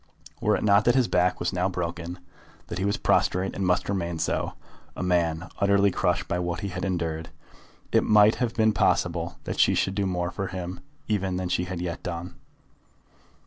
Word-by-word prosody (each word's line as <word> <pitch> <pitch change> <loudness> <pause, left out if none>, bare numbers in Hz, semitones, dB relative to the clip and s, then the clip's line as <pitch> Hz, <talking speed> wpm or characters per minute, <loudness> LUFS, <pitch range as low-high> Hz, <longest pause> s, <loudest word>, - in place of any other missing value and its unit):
Were - - +3
it - - -2
not 105 0 +4
that 120 - +4
his 130 -3 +3
back 90 0 +2
was 85 +2 -1
now 90 +1 +1
broken, 85 -1 -4 0.5
that 85 - -4
he 95 - 0
was 100 - +1
prostrate 95 +2 +1
and 100 - -3
must 90 0 +1
remain 85 -4 -2
so, - - -1 0.4
a - - -4
man 85 -1 +1
utterly 100 0 +4
crushed 90 -1 0
by 90 - -1
what 90 -1 -2
he 100 - -3
had 90 0 -5
endured, 80 -4 -2 0.6
it - - +4
might 105 0 +5
have 120 -2 -1
been 110 -1 +3
possible 85 -3 +1
that - - -4
she - - +5
should 95 - +1
do 100 -1 0
more 90 -1 -1
for 100 -2 -3
him 90 -1 -5 0.3
even 95 -3 0
than 90 -1 -2
she 90 0 0
yet 90 -1 -5
had 85 -2 -4
done. 85 0 -5
90 Hz, 195 wpm, -26 LUFS, 85-100 Hz, 0.6 s, might